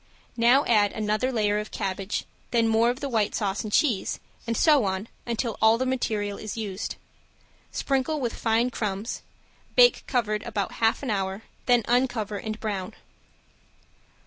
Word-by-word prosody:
Now 245 +5 +5
add 210 -3 +3
another 215 +4 0
layer 210 -3 +1
of 210 - -5
cabbage, 195 0 -3 0.2
then 230 -1 +2
more 225 +1 +4
of 250 +4 -3
the 285 - -1
white 220 -5 0
sauce 200 -2 -1
and 215 - -5
cheese, 230 -5 +1 0.3
and 230 -1 0
so 300 -6 +5
on 190 +2 -2 0.2
until 235 -1 -2
all 220 +1 +6
the 260 - -1
material 215 -6 -1
is 215 +1 -6
used. 205 -2 -4 0.8
Sprinkle 275 +3 0
with 240 -4 -2
fine 230 +2 +1
crumbs, 210 -1 -3 0.5
bake - - +6
covered 215 -5 0
about 215 -4 -3
half 225 +4 +2
an 255 - -1
hour, 195 +1 -2 0.2
then 245 -2 +4
uncover 240 -4 +1
and 215 +2 -5
brown. 205 -1 -4
225 Hz, 155 wpm, -26 LUFS, 205-245 Hz, 0.8 s, all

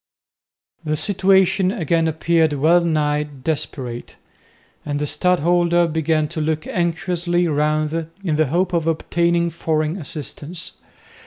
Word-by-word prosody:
The 155 -1 -1
situation 190 +1 +3
again 165 - 0
appeared 160 0 +1
well 160 +5 +3
nigh 150 -3 +1
desperate, 140 -4 -5 0.7
and 145 -1 -3
the 150 - -1
stadholder 175 +2 +2
began 160 -1 0
to 160 0 -3
look 155 0 -1
anxiously 175 0 0
round 155 +1 0 0.2
in 165 -5 0
the 155 0 +2
hope 180 +5 0
of 165 -2 0
obtaining 170 +1 +1
foreign 155 0 -1
assistance. 155 +1 -6
160 Hz, 115 wpm, -20 LUFS, 150-175 Hz, 0.7 s, situation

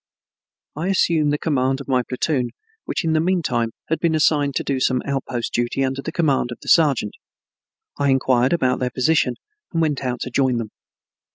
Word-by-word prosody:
I 160 +5 -3
assumed 165 -6 +2
the 150 - +1
command 135 -4 0
of 140 - -9
my 130 -2 +2
platoon 125 0 -1 0.4
which - - -2
in 160 - +1
the 155 - +3
mean 175 +1 +1
time 120 -4 0 0.2
had 160 - 0
been 165 -2 +1
assigned 145 -2 +2
to - - 0
do 135 -2 -1
some 130 -1 +1
outpost 135 -3 -3
duty 120 +3 0
under 135 +1 -3
the 160 - -5
command 145 -7 +1
of 120 - -6
the - - -6
sergeant. 140 -10 +3 0.9
I 140 -1 +2
inquired 130 -1 +2
about 130 -7 +1
their 125 - 0
position 125 0 +1 0.4
and 165 - -1
went 150 -4 0
out 125 -1 -3
to 125 - -4
join 130 -1 +2
them. 115 -2 -4
135 Hz, 195 wpm, -21 LUFS, 125-155 Hz, 0.9 s, the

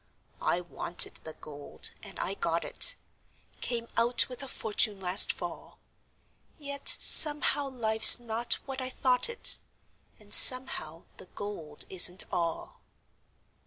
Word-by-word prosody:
I 175 - -4
wanted 175 0 -3
the 160 - -10
gold, 145 -2 -9
and 200 -2 -12
I 195 - -5
got 170 -3 -6
it - - -1 0.7
Came 235 -1 -6
out 235 +1 0
with 250 0 -10
a 270 - -8
fortune 210 -4 -2
last 185 0 +1
fall, - - -11 0.8
Yet 280 -2 -10
somehow 295 -2 +4
life's 220 -3 +6
not 235 0 -1
what 270 -1 -10
I 255 - -6
thought 255 - -3
it, 470 - -1 0.6
And 210 -1 -14
somehow 255 -11 +2
the - - -15
gold 170 -9 -7
isn't 180 0 +3
all. 170 -2 -7
220 Hz, 125 wpm, -25 LUFS, 180-255 Hz, 0.8 s, life's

